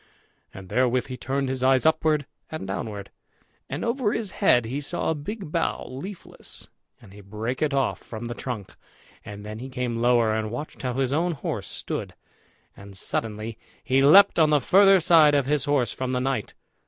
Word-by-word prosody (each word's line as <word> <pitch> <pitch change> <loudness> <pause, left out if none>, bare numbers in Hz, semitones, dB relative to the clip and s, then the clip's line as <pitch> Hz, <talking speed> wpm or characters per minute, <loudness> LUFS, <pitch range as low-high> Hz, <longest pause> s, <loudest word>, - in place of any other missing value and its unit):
And 95 -1 -11
therewith 125 +2 +1
he 130 - -4
turned 135 +2 -2
his 130 -1 -3
eyes 130 +1 +3
upward 155 -2 +2 0.2
and 155 -9 -6
downward; 100 +1 -5 0.6
and 140 +9 -3
over 235 -2 0
his 215 -4 -3
head 125 - +3
he 130 +6 -3
saw 160 +3 -2
a - - +2
big 170 +3 -6
bough 165 - -1
leafless, 180 +9 -8 0.3
and 95 - -16
he 105 - -12
brake 110 +6 -5
it 155 -1 +1
off 135 -1 0
from 110 0 -8
the 120 - -4
trunk. 120 -6 -6 0.5
And 105 0 -9
then 105 +1 -7
he 130 +2 -7
came 125 -3 -3
lower, 120 -2 +3
and 110 0 -2
watched 125 +7 -7
how 125 -1 -2
his 135 0 0
own 170 +3 +1
horse 140 - -4
stood; - - -5 0.6
and 100 -1 -12
suddenly 110 +2 -2 0.2
he 130 +1 +2
leapt 165 +7 +7
on 155 -1 +5
the 150 -1 +4
further 195 +7 +6
side 155 -3 +6
of 140 -2 +2
his 145 0 0
horse 140 -7 +1
from 130 0 -3
the 125 - +1
knight. 130 -5 -2
130 Hz, 190 wpm, -25 LUFS, 115-155 Hz, 0.6 s, leapt